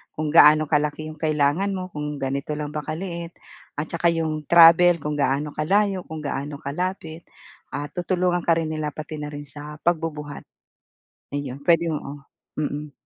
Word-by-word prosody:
kung 155 0 -2
gaano 155 -1 +7
kalaki 150 +1 0
'yong 155 - -10
kailangan 155 +5 +1
mo, 185 -1 -4
kung 150 -1 -4
ganito 140 +2 -2
lang 150 -1 -4
ba 150 - -3
kaliit 170 +1 -5 0.5
at 150 - -2
saka 170 0 +1
'yong 155 -2 -2
travel, 170 0 +7
kung 150 0 -2
gaano 140 +1 +1
kalayo, 195 +4 +1
kung 160 -1 -6
gaano 145 0 -4
kalapit. 165 +2 -4 0.5
Ah, 145 0 -3
tutulungan 180 0 0
ka 170 - +5
rin 160 -1 -2
nila, 155 -1 -3
pati 155 0 -7
na 150 0 -5
rin 145 0 -7
sa 150 +1 -9
pagbubuhat. 155 -4 -2 0.9
Ayun, 140 -2 -4
pwede 170 -1 +4
oo, 145 -1 -5 0.4
mm. 150 0 -3
155 Hz, 160 wpm, -23 LUFS, 150-170 Hz, 0.9 s, gaano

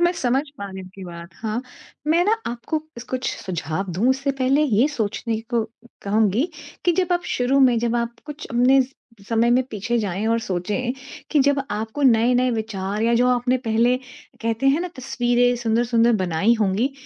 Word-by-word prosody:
मैं 345 0 +4
समझ 255 +1 +2 0.2
पा 200 - -5
रही 190 0 -7
आपकी 190 +1 -12
बात 170 0 -9
हाँ, 220 +1 -3 0.5
मैं 330 +3 +4
ना 440 +2 +3
आपको 240 +6 -2 0.3
कुछ 255 -1 -1
सुझाव 175 +1 -3
दूँ, 215 +9 +1
उससे 275 +1 0
पहले 270 +3 +3
ये 250 -1 +3
सोचने 225 -3 -2
को 235 -2 +2 0.4
कहूँगी 215 - +2 0.4
कि 350 - +4
जब 360 0 +1
आप 350 - +1
शुरू 255 +3 +2
में 250 -3 +5
जब 235 0 0
आप 235 0 -2
कुछ 295 0 -7
अपने 250 +3 +4 0.5
समय 230 +1 +2
में 250 +2 +4
पीछे 235 +3 -1
जाएँ 200 0 -2
और 230 +1 +2
सोचें 205 +7 -2 0.4
कि 295 - +4
जब 280 0 +2
आपको 220 +7 -3
नए-नए 250 +1 +4
विचार 215 -2 -3
या 235 +1 +3
जो 245 +2 +3
आपने 250 +1 +2
पहले 235 +3 +3 0.5
कहते 230 +3 0
हैं 280 +5 +4
ना 360 - -3
तस्वीरें 245 -1 +1
सुंदर-सुंदर 235 +1 +3
बनाई 180 +7 +2
होंगी, 215 +7 +1
235 Hz, 175 wpm, -22 LUFS, 215-260 Hz, 0.5 s, में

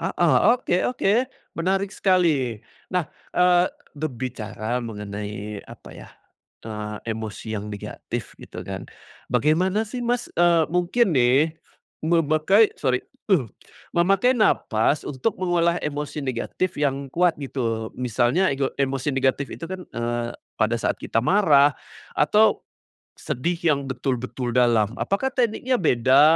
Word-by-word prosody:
Heeh. 165 -7 +2 0.2
Oke 180 -7 -1
oke. 205 -5 +1 0.4
Menarik 190 +3 0
sekali. 155 - +2 0.3
Nah, 180 -4 0 0.2
eee, 180 0 +4 0.3
berbicara 125 -4 -4
mengenai, 105 -1 -6
apa - - -13
ya, - - -11 0.6
eee, 105 -1 -5 0.2
emosi 110 0 -6
yang 105 0 -4
negatif, 105 -1 -6
gitu 90 +1 -9
kan. 95 0 -6 0.4
Bagaimana 185 +8 +2
sih, 245 +3 -6
Mas, 240 0 -1
eee 170 -1 +4
mungkin 180 +4 +2
nih, 135 +4 +3 0.5
memakai 165 +6 +3
sori, 130 -3 0 0.9
memakai 195 +8 +3
nafas 145 - +2
untuk 145 - -2
mengolah 175 -2 +1
emosi 150 0 -4
negatif 135 +7 -2
yang 140 -2 -1
kuat 175 -1 +3
gitu, 115 -6 -3
misalnya 125 - +1
ego 135 0 -1
emosi 135 +1 0
negatif 135 +1 0
itu - - -7
kan, 185 -1 -6
eee, 120 0 -2 0.3
pada 110 +2 +1
saat - - 0
kita 115 - -1
marah 145 - +4 0.4
atau - - +3 0.5
sedih 170 +8 -2
yang 150 -5 +1
betul-betul 125 -1 -3
dalam, 115 -3 +3
apakah 200 +7 0
tekniknya 245 +2 +1
beda, 130 - +4
140 Hz, 120 wpm, -24 LUFS, 120-180 Hz, 0.9 s, eee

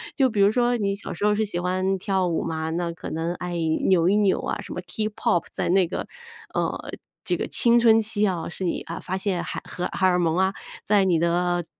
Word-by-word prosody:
就 265 -2 +3
比 215 -3 -3
如 200 +1 +6
说 245 +1 +2
你 200 -3 0
小 200 - -7
时 205 - -2
候 210 - +4
是 220 - +1
喜 185 -4 -3
欢 185 +2 0
跳 190 -1 0
舞 165 -2 -1
嘛， 160 0 -3
那 170 +1 -1
可 170 +1 -8
能 165 +2 -2
爱 180 -1 -5 0.3
扭 175 -3 +4
一 200 - +3
扭 205 -3 +3
啊， - - -3
什 195 - -8
么 180 - -4
K-pop 215 -3 -1
在 - - -2
那 185 0 +4
个， - - -4 0.5
呃， - - -2 0.3
这 - - 0
个 - - -3
青 235 0 +3
春 225 -1 +6
期 210 -1 +1
啊， 180 -4 -2
是 180 - -5
你， 175 - -1
啊， 165 - -6
发 185 +1 -3
现 190 -3 -1
海 180 - -5
荷 180 - -4
荷 190 - -1
尔 180 -1 +4
蒙 165 -1 +1
啊， 190 +1 +2 0.3
在 205 -1 +4
你 180 -3 +3
的 175 +1 +1
185 Hz, 265 characters per minute, -24 LUFS, 175-210 Hz, 0.5 s, 如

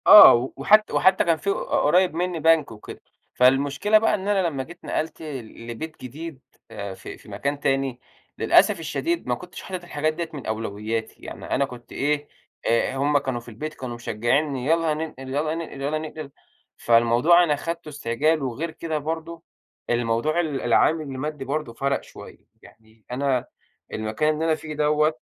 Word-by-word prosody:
آه، 130 - +9
وحت 215 +1 +4
وحتّى 190 0 +4
كان 165 -2 +2
في 200 - -3
قريّب 180 -1 +2
مني 175 0 -1
بنك 160 -3 +3
وكده، 105 -1 -10 0.3
فالمشكلة 140 +11 +4
بقى 215 0 +2
إن 195 -1 -5
أنا 195 -3 +2
لمّا 140 -5 -3
جيت 175 +5 -13
نقلت 160 +1 -3
لبيت 130 0 -7
جديد 145 +3 -7 0.3
آآ 100 -3 -6
في - - -10
في - - -17
مكان 140 +1 -3
تاني، 135 -2 0 0.4
للأسف - - +4
الشديد 340 0 -2
ما - - +1
كنتش 180 0 -10
حاطط 185 -2 -6
الحاجات 155 -2 -1
ديّة 165 0 -4
من 145 -4 -7
أولوياتي، 110 0 -4
يعني - - -8
أنا 140 - +1
كنت 120 -3 -12
إيه 145 +1 -1 0.4
آآ 115 +3 +1
هُم 145 +2 +3
كانوا 130 -3 -2
في 120 - -13
البيت 155 +8 -6
كانوا 125 -4 -6
مشجّعينني 125 +4 -1
يلّا 165 +1 +2
ننقل، 150 -4 -6
يلّا 150 +4 -1
ننقل، 165 -1 -5
يلّا 145 +3 0
ننقل، 155 -2 -7 0.5
فالموضوع 120 +9 +5
أنا 150 -4 +2
خدته 165 +2 -5
استعجال 145 +3 0
وغير 135 +6 -3
كده 160 -1 -3
برضه، 165 +2 -5 0.5
الموضوع 120 +6 +1
ال 155 -5 -1
العامل 155 +7 +3
المادّي 140 0 -5
برضه 145 -3 -3
فرَق 140 +3 -1
شوية، - - -13 0.2
يعني 110 -1 -20
أنا 130 -1 0 0.5
المكان 110 +8 0
اللي 155 +1 -2
أنا 160 -1 +3
فيه 155 -1 -8
دوّة 150 +1 +2
145 Hz, 165 wpm, -24 LUFS, 125-160 Hz, 0.5 s, آه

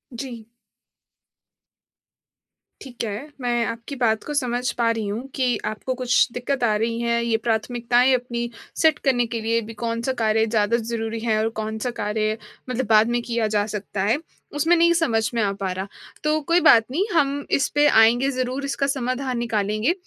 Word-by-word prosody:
जी। 230 -3 -7 2.3
ठीक 245 -3 -7
है, 220 +7 -4
मैं 240 -1 0
आपकी 230 +5 -5
बात 220 -2 +2
को 295 - -5
समझ 250 -3 0
पा 235 -1 +1
रही 225 -2 -3
हूँ 225 +6 -4
कि 255 -2 +1
आपको 215 +4 -3
कुछ 250 0 +3
दिक्कत 245 +1 -2
आ 215 -2 +3
रही 230 +2 -1
है, 235 0 0
ये 230 -1 +2
प्राथमिकताएँ 240 +3 +1
अपनी 240 -1 -3 0.3
सेट 315 -2 +4
करने 245 -2 +3
के 230 - -1
लिए। 230 +1 +1
अभी 225 +1 -9
कौन-सा 230 +2 -1
कार्य 220 0 +3
ज़्यादा 220 +1 +1
ज़रूरी 225 -1 -3
है 220 -1 0
और 220 +1 +1
कौन-सा 220 +2 -3
कार्य 215 +1 -1 0.3
मतलब 250 0 -1
बाद 215 0 +6
में 240 0 0
किया 235 -2 -1
जा 205 - +2
सकता 205 -1 -4
है, 215 +6 +2 0.4
उसमें 325 +4 +3
नहीं 340 0 +4
समझ 225 -7 +1
में 230 - +1
आ 200 - +1
पा 195 -1 -3
रहा। 190 +2 -4 0.4
तो 305 +1 +2
कोई 335 +4 +3
बात 225 -1 +7
नहीं, 340 +8 +1
हम 285 -2 +1
इस 275 - +2
पे 295 0 +5
आएँगे 240 +2 +5
ज़रूर, 255 +2 -2
इसका 275 0 -1
समाधान 255 -1 -2
निकालेंगे। 215 - 0
235 Hz, 180 wpm, -23 LUFS, 220-255 Hz, 2.3 s, बात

